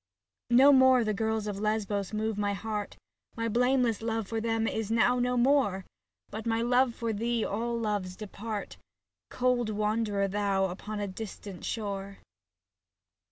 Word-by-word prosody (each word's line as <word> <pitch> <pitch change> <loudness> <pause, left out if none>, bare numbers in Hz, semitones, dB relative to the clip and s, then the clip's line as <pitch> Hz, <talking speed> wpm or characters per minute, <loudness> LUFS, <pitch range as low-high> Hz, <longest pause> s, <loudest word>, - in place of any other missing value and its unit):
No 265 +4 +7
more 260 -2 +6
the 215 -1 0
girls 220 +1 -1
of 205 -2 -4
Lesbos 210 -2 -1
move 215 0 -1
my 205 0 0
heart, 210 0 -4 0.4
My 230 0 -2
blameless 245 0 +2
love 225 -2 -2
for 225 +1 -2
them 225 0 0
is 220 -2 -2
now 240 +2 +3
no 250 0 +1
more. 240 -7 +2 0.5
Before 215 - -4
my 225 0 +1
love 245 0 +3
for 230 -2 -2
thee 230 +2 -1
all 235 +3 -2
loves 205 -5 -2
depart. 210 0 -6 0.5
Cold 250 -2 +1
wanderer 210 -1 0
thou 195 -1 +1
upon 210 +4 -6
a 205 - -2
distant 200 -1 -8
shore. 200 -3 -4
220 Hz, 150 wpm, -29 LUFS, 205-235 Hz, 0.5 s, No